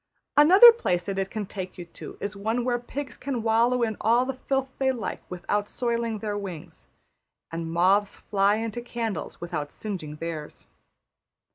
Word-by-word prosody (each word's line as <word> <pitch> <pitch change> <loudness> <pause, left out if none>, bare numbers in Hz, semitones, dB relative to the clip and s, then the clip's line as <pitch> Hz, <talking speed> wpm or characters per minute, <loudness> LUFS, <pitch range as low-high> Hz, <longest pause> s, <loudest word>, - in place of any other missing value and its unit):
Another 375 +11 +10
place 180 - -1
that 195 -1 -2
it 195 0 -1
can 215 -2 -4
take 185 -2 -7
you 175 - -7
to 170 - -10
is 205 0 -4
one 220 +4 -1
where 245 -1 +1
pigs 260 0 -6
can 255 -4 -3
wallow 235 +2 +3
in 220 -2 -1
all 235 +3 +4
the 270 - -2
filth 270 +1 -1
they 265 -1 +3
like 240 -5 -4
without 205 +3 -2
soiling 235 -2 -1
their 210 0 -3
wings; 190 -6 -7 0.6
and 165 0 -4
moths 190 +4 +3
fly 200 0 +2
into 225 +2 -3
candles 230 -5 -4
without 155 -4 -4
singeing 180 -8 -6
theirs. 155 -1 -6
215 Hz, 165 wpm, -26 LUFS, 185-240 Hz, 0.6 s, Another